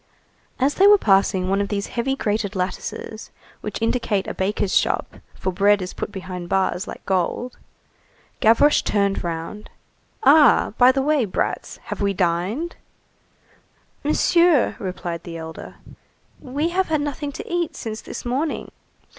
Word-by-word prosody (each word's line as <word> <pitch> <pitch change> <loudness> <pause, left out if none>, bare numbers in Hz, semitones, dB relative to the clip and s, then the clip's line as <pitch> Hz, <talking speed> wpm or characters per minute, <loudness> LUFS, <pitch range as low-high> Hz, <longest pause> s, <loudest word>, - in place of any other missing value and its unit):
As 275 +2 +2
they 390 - +5
were 415 0 +8
passing 195 - +2
one 195 +1 +1
of 200 - -1
these 200 -1 -2
heavy 255 +3 0
grated 210 -4 -2
lattices, 190 +3 -4 0.3
which 210 -2 -5
indicate 225 -4 0
a - - -4
baker's 195 0 -1
shop, - - 0 0.2
for 185 - -2
bread 205 +3 +3
is 185 -1 -5
put - - -5
behind 185 -2 -7
bars 190 +1 0
like - - -9
gold, 190 +7 -1 0.8
Gavroche 230 +7 +5
turned 200 -1 0
round:— 170 +5 -5 0.5
"Ah, 290 - +6
by 250 +1 +8
the 270 0 0
way, 295 -4 +2
brats, 185 - -3 0.2
have - - -7
we 200 0 +1
dined?" 185 - -1 1.3
"Monsieur," 330 0 +3
replied 180 -4 -4
the 170 -2 -8
elder, 160 0 -8 0.6
"we 285 +6 -2
have 375 +2 0
had 310 -2 0
nothing 290 0 -3
to - - -7
eat 345 -2 -2
since 220 -1 -5
this - - -8
morning." 275 +6 -2
210 Hz, 145 wpm, -22 LUFS, 190-280 Hz, 1.3 s, were